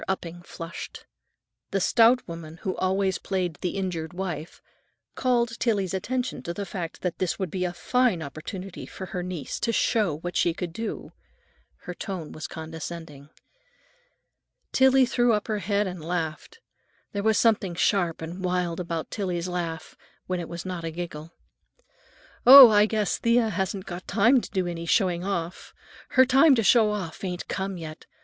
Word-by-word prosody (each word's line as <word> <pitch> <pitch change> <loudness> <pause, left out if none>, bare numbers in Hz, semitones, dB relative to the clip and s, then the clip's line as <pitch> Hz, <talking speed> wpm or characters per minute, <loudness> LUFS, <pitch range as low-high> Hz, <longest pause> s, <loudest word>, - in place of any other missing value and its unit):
Upping 175 -2 -4
flushed. 165 -1 -8 0.6
The 195 - 0
stout 235 +5 +4
woman 165 -1 -8
who 190 -3 -2
always 190 0 0
played 180 -5 -2
the 180 +2 -2
injured 175 -4 -3
wife 175 -4 -5 0.5
called 235 -3 0
Tillie's 200 -6 0
attention 250 +7 -2
to 170 - -5
the 200 - -4
fact 175 -4 -6
that 180 -2 -2
this 185 -2 -1
would 190 -5 -3
be 185 -1 -1
a 180 - -1
fine 230 0 +1
opportunity 175 +6 -7
for 190 - -8
her 180 -1 -4
niece 175 -6 -5
to 230 - 0
show 210 -9 +1
what 175 +3 -6
she 170 -2 +2
could 175 -2 -5
do. 225 +3 -5 0.7
Her 180 - -6
tone 175 -4 -6
was 155 - -6
condescending. 160 -2 -8 1.4
Tillie 265 0 +5
threw 240 -1 +2
up 210 -1 -1
her 215 -2 -1
head 200 +2 0
and 180 -4 -6
laughed; 165 - -4 0.5
there 200 - -2
was 220 0 +2
something 205 -6 +2
sharp 175 -3 +1
and 175 +4 -7
wild 180 -2 -1
about 170 -2 -4
Tillie's 180 -4 -2
laugh—when 175 +1 -5
it 170 - -6
was 170 +1 -6
not 180 -2 -4
a 165 - -2
giggle. 165 -1 -7 1.1
"Oh, 260 -2 +12
I 210 0 +5
guess 215 -3 0
Thea 235 -1 +3
hasn't 190 -1 -2
got 175 0 -7
time 230 +6 +4
to - - -8
do 190 -3 -1
any 170 -1 -5
showing 180 -2 +2
off. 180 -3 -4 0.3
Her 260 0 +5
time 270 +3 +6
to 225 - +1
show 220 0 +5
off 200 -6 -5
ain't 180 -2 -4
come 190 -1 -3
yet. 155 -1 -9
185 Hz, 165 wpm, -26 LUFS, 170-210 Hz, 1.4 s, Oh